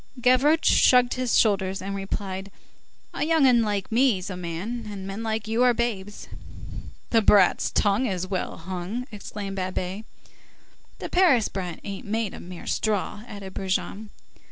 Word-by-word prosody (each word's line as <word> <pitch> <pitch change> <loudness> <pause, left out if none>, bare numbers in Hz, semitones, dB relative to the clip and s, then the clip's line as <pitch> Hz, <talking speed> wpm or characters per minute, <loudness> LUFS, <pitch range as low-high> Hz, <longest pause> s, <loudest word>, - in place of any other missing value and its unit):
Gavroche 260 +6 +4
shrugged 250 -1 +5
his 255 -2 +1
shoulders, 195 -3 +2
and 195 +1 -4
replied:— 195 0 -4 0.6
"A - - -2
young 320 -2 +3
'un 245 -3 +5
like 205 -2 -2
me's 220 -6 +2
a - - -4
man, 180 +7 -5
and 195 -2 -7
men 195 +3 -5
like 220 -1 -2
you 225 +2 0
are 250 -1 +5
babes." 210 -4 -3 0.8
"The 225 - +5
brat's 200 -3 +4
tongue's 200 -3 +1
well 185 -1 -3
hung!" 185 +7 -5
exclaimed 200 -1 -6
Babet. 185 +2 -3 0.9
"The - - -6
Paris 330 - +4
brat 180 -4 -5
ain't 200 0 -7
made 220 -1 -1
of 180 0 -9
straw," 210 -1 -1
added 195 -3 -8
Brujon. 195 +2 -3
205 Hz, 145 wpm, -25 LUFS, 190-235 Hz, 0.9 s, shrugged